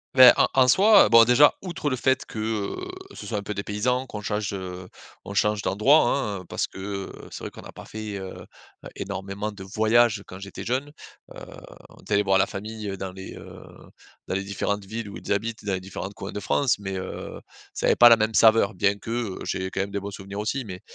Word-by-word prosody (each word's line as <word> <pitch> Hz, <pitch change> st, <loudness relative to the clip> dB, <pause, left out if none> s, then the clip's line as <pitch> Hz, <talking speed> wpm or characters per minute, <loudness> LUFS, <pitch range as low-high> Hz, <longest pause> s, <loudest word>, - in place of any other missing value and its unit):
Ben, 130 Hz, -2 st, +10 dB
en -, -, +4 dB
en 130 Hz, -1 st, +5 dB
soi 200 Hz, -, +6 dB
bon 115 Hz, 0 st, +8 dB
déjà 125 Hz, +5 st, +6 dB
outre 175 Hz, -5 st, -5 dB
le -, -, +1 dB
fait 130 Hz, +1 st, +1 dB
que, 110 Hz, -, -8 dB
heu, 110 Hz, -2 st, -2 dB, 0.4 s
ce -, -, -9 dB
soit 105 Hz, -, -2 dB
un 100 Hz, -, -4 dB
peu 105 Hz, -, -4 dB
dépaysant 115 Hz, +6 st, -1 dB
qu'on 105 Hz, -3 st, -7 dB
change, 105 Hz, 0 st, -2 dB
heu, 90 Hz, -1 st, -6 dB, 0.4 s
on 100 Hz, -, -8 dB
change 105 Hz, -1 st, +2 dB
d'endroit, 135 Hz, +12 st, +4 dB
hein. 105 Hz, -10 st, -2 dB
Parce -, -, -1 dB
que, -, -, -12 dB
heu, 100 Hz, 0 st, -5 dB, 0.2 s
c'est -, -, -9 dB
vrai -, -, -5 dB
qu'on -, -, -12 dB
a -, -, -11 dB
pas -, -, -12 dB
fait, 110 Hz, -1 st, -6 dB
heu, 95 Hz, -1 st, -7 dB
heu, -, -, -12 dB, 0.5 s
énormément 100 Hz, +2 st, -5 dB
de 100 Hz, -2 st, -10 dB
voyages 110 Hz, +3 st, +2 dB
quand 95 Hz, -, -10 dB
j'étais 100 Hz, 0 st, -8 dB
jeune. 135 Hz, +4 st, -2 dB, 0.4 s
Heu, -, -, -8 dB, 0.5 s
on -, -, -18 dB
était 105 Hz, -, -1 dB
aller 105 Hz, -, +3 dB
voir 95 Hz, -1 st, +3 dB
la -, -, +3 dB
famille 105 Hz, -1 st, -6 dB
dans 95 Hz, -1 st, -5 dB
les, 95 Hz, 0 st, -9 dB
heu, -, -, -11 dB, 0.7 s
dans -, -, -3 dB
les 95 Hz, +1 st, -1 dB
différentes 100 Hz, 0 st, -2 dB
villes 110 Hz, +1 st, -6 dB
où -, -, -8 dB
ils -, -, -7 dB
habitent, 110 Hz, +2 st, -2 dB
dans 100 Hz, -2 st, -2 dB
les 95 Hz, -, -1 dB
différentes 95 Hz, +1 st, -7 dB
coins 95 Hz, -, -7 dB
de 105 Hz, -, -5 dB
France. 125 Hz, +4 st, +1 dB
Mais, 95 Hz, -1 st, -5 dB
heu, 95 Hz, 0 st, -6 dB, 0.4 s
ça -, -, -2 dB
avait -, -, +4 dB
pas 120 Hz, 0 st, +9 dB
la 115 Hz, -, +7 dB
même 110 Hz, +1 st, 0 dB
saveur. 110 Hz, -3 st, +5 dB
Bien 100 Hz, +2 st, +1 dB
que, 110 Hz, +3 st, -8 dB
heu, 115 Hz, -5 st, -3 dB
j'ai 95 Hz, 0 st, -2 dB
quand 95 Hz, -, -2 dB
même 100 Hz, 0 st, -4 dB
des 100 Hz, -, -2 dB
bons 100 Hz, +1 st, -6 dB
souvenirs 100 Hz, +1 st, -8 dB
aussi. 120 Hz, +4 st, -2 dB
Mais 95 Hz, -1 st, -8 dB
105 Hz, 235 wpm, -25 LUFS, 100-115 Hz, 0.7 s, Ben